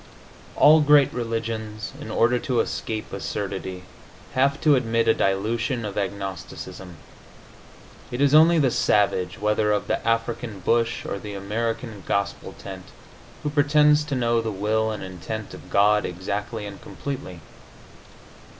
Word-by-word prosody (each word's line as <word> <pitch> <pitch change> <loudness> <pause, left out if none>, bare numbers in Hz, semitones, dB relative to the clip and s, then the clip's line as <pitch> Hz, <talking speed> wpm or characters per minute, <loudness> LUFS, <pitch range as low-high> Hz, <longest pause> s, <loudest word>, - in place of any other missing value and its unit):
All 155 +1 +7
great 145 -1 +5
religions, 115 -3 -4
in - - -7
order 120 +3 +2
to 125 -4 -1
escape 110 -1 -3
absurdity, 95 -2 -4 0.5
have 140 +2 +2
to 150 - +5
admit 115 -2 +1
a 110 - +6
dilution 110 +5 0
of 105 -1 -5
agnosticism. 95 -2 -5 1.1
It 120 - -5
is 140 0 +3
only 165 +2 +7
the 135 -5 +3
savage, 95 -4 +1
whether 105 0 +1
of 105 - 0
the - - -1
African 115 -2 -1
bush 115 +4 +1
or 100 - -3
the 105 0 -7
American 110 +2 -3
gospel 100 +1 -2
tent, - - -9 0.6
who 150 - -1
pretends 150 +1 +4
to 145 -2 -2
know 120 -2 +2
the 115 - -3
will 110 +2 0
and 110 -2 -4
intent 95 +4 -6
of - - -12
God 105 +1 +4
exactly 105 +4 -4
and 100 -1 -9
completely. 130 -11 -6
110 Hz, 140 wpm, -24 LUFS, 100-125 Hz, 1.1 s, All